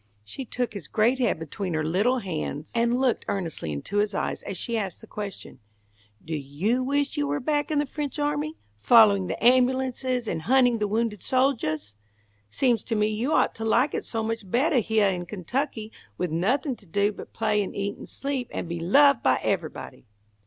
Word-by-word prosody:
She 255 Hz, -, -7 dB
took 245 Hz, 0 st, -3 dB
his 200 Hz, -8 st, -7 dB
great 235 Hz, +5 st, +2 dB
head 240 Hz, -8 st, +2 dB
between 165 Hz, +3 st, -4 dB
her 155 Hz, -, 0 dB
little 200 Hz, +11 st, +2 dB
hands 160 Hz, -, -4 dB
and 235 Hz, +1 st, +2 dB
looked 260 Hz, -3 st, +1 dB
earnestly 165 Hz, -, -3 dB
into 75 Hz, -, -4 dB
his 205 Hz, -1 st, +1 dB
eyes -, -, -2 dB
as 195 Hz, -, -5 dB
she 235 Hz, +6 st, -2 dB
asked 195 Hz, -6 st, -3 dB
the -, -, -11 dB
question. 205 Hz, -2 st, -7 dB, 0.7 s
"Do 160 Hz, 0 st, -3 dB
you 155 Hz, -, -1 dB
wish 285 Hz, +3 st, 0 dB
you 290 Hz, -1 st, +1 dB
were 285 Hz, 0 st, -1 dB
back 290 Hz, +3 st, 0 dB
in 305 Hz, -, 0 dB
the 290 Hz, -, +2 dB
French 290 Hz, +1 st, -5 dB
army, 295 Hz, +1 st, -1 dB, 0.2 s
following 205 Hz, -, +6 dB
the -, -, -3 dB
ambulances 255 Hz, -1 st, +2 dB
and 165 Hz, -5 st, -2 dB
hunting 245 Hz, +3 st, +3 dB
the 210 Hz, -, 0 dB
wounded 215 Hz, -1 st, -1 dB
soldiahs? 230 Hz, -, 0 dB, 0.6 s
Seems 240 Hz, -, +1 dB
to 230 Hz, -, -1 dB
me 210 Hz, 0 st, +2 dB
you 225 Hz, +7 st, -1 dB
ought -, -, +3 dB
to 225 Hz, -, -7 dB
like 240 Hz, +6 st, +2 dB
it -, -, -2 dB
so 225 Hz, -1 st, -3 dB
much 225 Hz, -3 st, -4 dB
bettah 265 Hz, -, +3 dB
heah 215 Hz, -3 st, +2 dB
in 175 Hz, -1 st, -4 dB
Kentucky, 220 Hz, -, -3 dB, 0.3 s
with, 180 Hz, -3 st, -2 dB
nothing 250 Hz, -, 0 dB
to 200 Hz, -, -16 dB
do 200 Hz, +5 st, +1 dB
but -, -, -10 dB
play 215 Hz, -2 st, +1 dB
and 200 Hz, -, -5 dB
eat 200 Hz, 0 st, -2 dB
and -, -, -10 dB
sleep, 275 Hz, -3 st, -3 dB
and -, -, -4 dB
be 170 Hz, 0 st, -4 dB
loved 275 Hz, +9 st, +5 dB
by 130 Hz, -1 st, +3 dB
everybody." -, -, -3 dB
225 Hz, 195 wpm, -26 LUFS, 190-260 Hz, 0.7 s, following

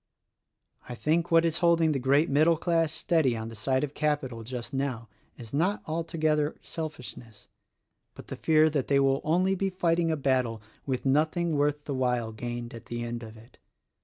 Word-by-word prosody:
I 120 Hz, -, -5 dB
think 165 Hz, +6 st, 0 dB
what 165 Hz, 0 st, +5 dB
is 165 Hz, -1 st, 0 dB
holding 170 Hz, -2 st, +3 dB
the 140 Hz, -, 0 dB
great 140 Hz, +5 st, +3 dB
middle 155 Hz, +4 st, +3 dB
class 165 Hz, -1 st, +1 dB
steady 155 Hz, -8 st, +1 dB
on 110 Hz, 0 st, -5 dB
the 115 Hz, -, -9 dB
side 130 Hz, +5 st, 0 dB
of 145 Hz, -1 st, -3 dB
Capital 145 Hz, -6 st, -1 dB
just 120 Hz, +2 st, -7 dB
now 130 Hz, -5 st, -3 dB, 0.3 s
is 115 Hz, -1 st, -11 dB
not 180 Hz, +8 st, 0 dB
altogether 155 Hz, -2 st, 0 dB
selfishness, 125 Hz, -9 st, -8 dB, 0.7 s
but -, -, -11 dB
the -, -, -7 dB
fear 155 Hz, -1 st, +4 dB
that 145 Hz, -4 st, -1 dB
they 140 Hz, -1 st, +3 dB
will 135 Hz, 0 st, +2 dB
only 180 Hz, +5 st, +2 dB
be 195 Hz, +1 st, -1 dB
fighting 170 Hz, -2 st, +1 dB
a 160 Hz, -, 0 dB
battle 130 Hz, -5 st, 0 dB, 0.3 s
with 130 Hz, -1 st, -2 dB
nothing 155 Hz, +4 st, +1 dB
worth 145 Hz, 0 st, 0 dB
the 145 Hz, -, -3 dB
while 125 Hz, -3 st, 0 dB
gained 120 Hz, +1 st, -6 dB
at 115 Hz, -, -11 dB
the 120 Hz, 0 st, -4 dB
end 120 Hz, 0 st, -4 dB
of 110 Hz, -1 st, -10 dB
it. 115 Hz, +4 st, -18 dB
145 Hz, 185 wpm, -28 LUFS, 120-160 Hz, 0.7 s, what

